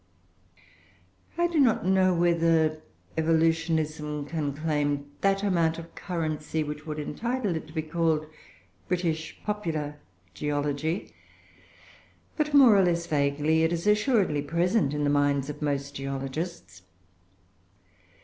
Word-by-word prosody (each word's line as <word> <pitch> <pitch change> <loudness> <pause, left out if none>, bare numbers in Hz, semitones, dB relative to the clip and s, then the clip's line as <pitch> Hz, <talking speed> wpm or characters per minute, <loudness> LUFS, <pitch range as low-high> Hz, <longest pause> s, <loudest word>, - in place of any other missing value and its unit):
I 345 - +3
do 340 -2 +1
not 245 -9 +3
know 190 0 +4
whether 165 -2 +2 0.4
Evolutionism 160 -2 +1
can 150 -2 -2
claim 145 -1 -1
that 195 0 +2
amount 170 -5 +2
of 165 0 -10
currency 160 -3 -3
which 150 +1 -7
would 155 0 -4
entitle 215 - -2
it 160 - -5
to 155 - -14
be 160 -1 -2
called 160 -1 0 0.6
British 165 -3 -2
popular 160 -8 -3 0.3
geology; 150 +4 -2 1.2
but, 300 -1 0
more 270 -7 +7
or 195 - +5
less 170 -1 +1
vaguely, 150 +1 +1
it 160 +1 +2
is 170 +1 -2
assuredly 210 - +2
present 170 0 +1
in 150 - -1
the 145 - +2
minds 145 -1 +1
of 150 - -12
most 140 -1 -2
geologists. 135 - -5
160 Hz, 120 wpm, -27 LUFS, 150-175 Hz, 1.2 s, more